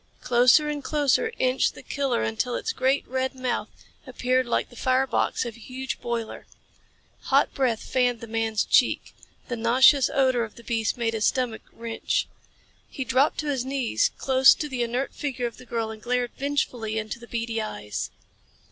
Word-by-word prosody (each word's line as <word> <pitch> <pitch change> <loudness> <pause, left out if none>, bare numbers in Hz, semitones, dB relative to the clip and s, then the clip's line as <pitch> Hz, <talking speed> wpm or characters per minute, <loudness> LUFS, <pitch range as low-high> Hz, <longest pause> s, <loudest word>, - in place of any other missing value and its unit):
Closer 250 +5 +5
and 295 -1 -3
closer 300 - +1
inched 255 +1 +1
the - - -11
killer 275 - -1
until 110 - -1
its - - -2
great, 265 +2 +1
red 260 +1 -2
mouth 255 -2 -2 0.4
appeared 255 0 0
like 235 - -1
the - - -14
fire 255 +2 +2
box 260 - 0
of 235 -2 -6
a - - -15
huge 260 +3 -6
boiler. 235 -2 -4 0.8
Hot 275 +1 +3
breath 245 -5 0
fanned 245 -2 +1
the - - -7
man's 225 -1 0
cheek. - - +2 0.3
The 245 - -3
nauseous 250 +4 +5
odor 260 -3 +2
of 220 - -8
the 235 - -13
beast 225 -1 -1
made 230 -1 0
his 220 -1 +1
stomach 250 -4 -1
wrench. 230 -1 -2 0.6
He 265 - -4
dropped 260 +3 +2
to 300 - -3
his 265 -4 0
knees 265 -2 0
close 265 0 +6
to 300 - -4
the 260 -4 -3
inert 245 +3 -1
figure 260 -4 -3
of 235 - -5
the 255 - -14
girl 225 -1 -2
and 220 -1 -10
glared 245 +1 -1
vengefully 250 -6 -2
into 220 +1 -4
the 235 - -12
beady 230 -1 -2
eyes. 105 - -4
250 Hz, 180 wpm, -25 LUFS, 230-265 Hz, 0.8 s, close